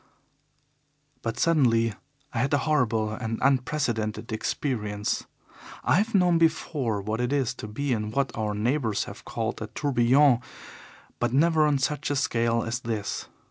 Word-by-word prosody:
But 115 Hz, -1 st, -3 dB
suddenly 120 Hz, -9 st, +3 dB, 0.4 s
I 115 Hz, -, -1 dB
had 135 Hz, +4 st, +2 dB
a 145 Hz, -, -1 dB
horrible 115 Hz, -8 st, +1 dB
and 110 Hz, 0 st, -3 dB
unprecedented 125 Hz, -5 st, 0 dB
experience. 105 Hz, -2 st, -2 dB, 0.6 s
I 130 Hz, +6 st, +3 dB
have 215 Hz, +3 st, +1 dB
known 180 Hz, -3 st, +4 dB
before 150 Hz, -9 st, +1 dB
what 110 Hz, +3 st, -2 dB
it 125 Hz, +1 st, -1 dB
is 135 Hz, -4 st, +1 dB
to 105 Hz, -, -8 dB
be 130 Hz, +6 st, -1 dB
in 105 Hz, -2 st, -2 dB
what 135 Hz, +4 st, -1 dB
our 105 Hz, -2 st, -2 dB
neighbours 115 Hz, 0 st, 0 dB
have -, -, -10 dB
called -, -, -3 dB
a -, -, -3 dB
tourbillon, 130 Hz, 0 st, +3 dB, 0.8 s
but 120 Hz, 0 st, 0 dB
never 155 Hz, +2 st, +4 dB
on 145 Hz, -2 st, +2 dB
such 140 Hz, +3 st, -1 dB
a 145 Hz, -, 0 dB
scale 115 Hz, -4 st, +1 dB
as 115 Hz, +2 st, -2 dB
this. 115 Hz, -4 st, -3 dB
125 Hz, 150 wpm, -26 LUFS, 110-145 Hz, 0.8 s, known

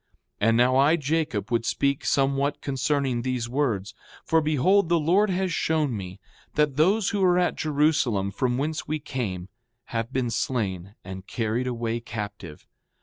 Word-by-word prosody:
6:8 105 Hz, -, +3 dB
And 115 Hz, -, +3 dB
now 125 Hz, +2 st, +4 dB
I, 145 Hz, +4 st, +5 dB
Jacob, 150 Hz, -7 st, -1 dB
would 115 Hz, -1 st, +1 dB
speak 140 Hz, +3 st, 0 dB
somewhat 140 Hz, +1 st, +1 dB
concerning 135 Hz, -2 st, 0 dB
these 125 Hz, -2 st, -2 dB
words. 120 Hz, -7 st, -1 dB, 0.3 s
For 160 Hz, 0 st, +3 dB
behold, 160 Hz, +5 st, +2 dB
the 170 Hz, -1 st, +3 dB
Lord 185 Hz, +7 st, +3 dB
has 185 Hz, -1 st, -1 dB
shown 155 Hz, -7 st, 0 dB
me 95 Hz, -1 st, -7 dB, 0.4 s
that 150 Hz, -3 st, +2 dB
those 190 Hz, +8 st, +3 dB
who 205 Hz, -, -1 dB
were 180 Hz, -1 st, +4 dB
at 180 Hz, -1 st, +2 dB
Jerusalem, 140 Hz, -10 st, +1 dB
from 125 Hz, +5 st, -1 dB
whence 155 Hz, +3 st, -2 dB
we 155 Hz, +1 st, -1 dB
came, 105 Hz, -11 st, -4 dB, 0.5 s
have 115 Hz, +1 st, -2 dB
been 130 Hz, -3 st, -1 dB
slain 105 Hz, -6 st, -2 dB
and 95 Hz, +1 st, -8 dB
carried 115 Hz, +2 st, -1 dB
away 115 Hz, -1 st, -2 dB
captive. 105 Hz, -8 st, -7 dB
130 Hz, 160 wpm, -25 LUFS, 115-155 Hz, 0.5 s, I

